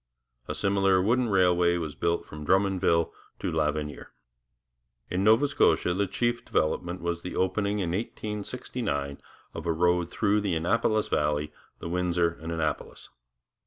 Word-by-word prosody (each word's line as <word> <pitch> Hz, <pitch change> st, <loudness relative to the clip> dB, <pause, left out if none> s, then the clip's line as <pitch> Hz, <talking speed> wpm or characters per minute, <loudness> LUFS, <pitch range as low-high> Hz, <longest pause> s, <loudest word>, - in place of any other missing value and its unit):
A -, -, -3 dB
similar 95 Hz, -1 st, +2 dB
wooden 120 Hz, +5 st, +2 dB
railway 90 Hz, -2 st, +3 dB
was 80 Hz, -3 st, -4 dB
built 85 Hz, +3 st, -1 dB
from 75 Hz, 0 st, -9 dB
Drummondville 95 Hz, -2 st, +2 dB, 0.3 s
to -, -, -3 dB
L'Avenir. 75 Hz, -1 st, -2 dB, 1.0 s
In 90 Hz, +2 st, 0 dB
Nova 110 Hz, +7 st, +5 dB
Scotia 115 Hz, -9 st, +2 dB
the 100 Hz, +2 st, 0 dB
chief 120 Hz, +5 st, 0 dB
local -, -, -26 dB
development 85 Hz, +3 st, 0 dB
was 85 Hz, 0 st, -2 dB
the 90 Hz, -, -6 dB
opening 100 Hz, +2 st, 0 dB
in 90 Hz, -4 st, -1 dB
1869 105 Hz, -, -4 dB, 0.3 s
of -, -, -6 dB
a -, -, +3 dB
road 90 Hz, +1 st, +2 dB
through 105 Hz, +1 st, +1 dB
the 100 Hz, -4 st, 0 dB
Annapolis 110 Hz, +6 st, +1 dB
Valley, 75 Hz, 0 st, 0 dB, 0.2 s
the -, -, -7 dB
Windsor 85 Hz, -1 st, +1 dB
and 80 Hz, +1 st, -5 dB
Annapolis. 80 Hz, -2 st, -3 dB
90 Hz, 145 wpm, -27 LUFS, 85-100 Hz, 1.0 s, Nova